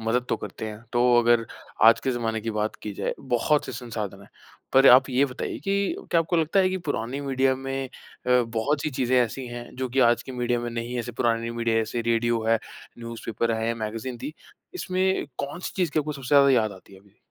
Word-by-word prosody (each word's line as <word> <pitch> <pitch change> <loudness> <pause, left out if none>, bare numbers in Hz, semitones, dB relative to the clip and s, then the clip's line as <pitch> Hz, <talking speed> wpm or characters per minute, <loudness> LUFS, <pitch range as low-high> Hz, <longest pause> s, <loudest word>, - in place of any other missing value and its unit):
मदद 115 +3 0
तो - - +1
करते 110 - -7
हैं। 105 +1 -8
तो 120 0 +2 0.2
अगर 120 -1 +3 0.4
आज 115 0 +7
के 130 - -1
जमाने 115 -2 -2
की 115 - -3
बात 105 0 -2
की 105 - -4
जाए - - -2
बहुत 130 +3 +1
से - - -5
संसाधन 110 -5 -5
हैं। - - -16 0.4
पर 135 +1 +6
आप 125 +2 +7
ये 130 +2 +3
बताइए 130 -1 -5
कि 195 +4 0 0.2
क्या 165 - +4
आपको 170 +2 0
लगता 165 +4 +3
है 185 - +3
कि 190 - -1
पुरानी 130 +2 -2
मीडिया 135 -1 +1
में 135 0 -4 0.4
अ, 125 0 +4
बहुत 120 +6 -1
सी 155 - -1
चीज़ें 130 -1 +1
ऐसी 125 +2 -2
हैं 120 0 -7
जो 130 0 -2
कि 130 +2 +1
आज 120 - 0
की 130 - -8
मीडिया 120 -1 0
में 120 0 -4
नहीं 115 +1 -4
हैं, 125 - -1
ऐसे 120 +1 -6
पुरानी 115 0 0
मीडिया 115 -1 0
ऐसे 110 +2 -2
रेडियो 115 0 +1
है, 115 0 +4 0.4
न्यूज़पेपर 115 0 -3
है, 115 +1 -1
मैगज़ीन 115 +2 -5
थी, 150 - -6 0.4
इसमें 190 - 0
कौन-सी 145 +6 -4
चीज़ 180 -4 +1
की 155 - 0
आपको 150 0 -1
सबसे 135 -3 -8
ज़्यादा 140 -1 +7
याद 110 -5 +3
आती 95 +1 -15
है 95 - -15
अभी? 100 +1 -26
120 Hz, 225 wpm, -25 LUFS, 115-135 Hz, 0.4 s, आज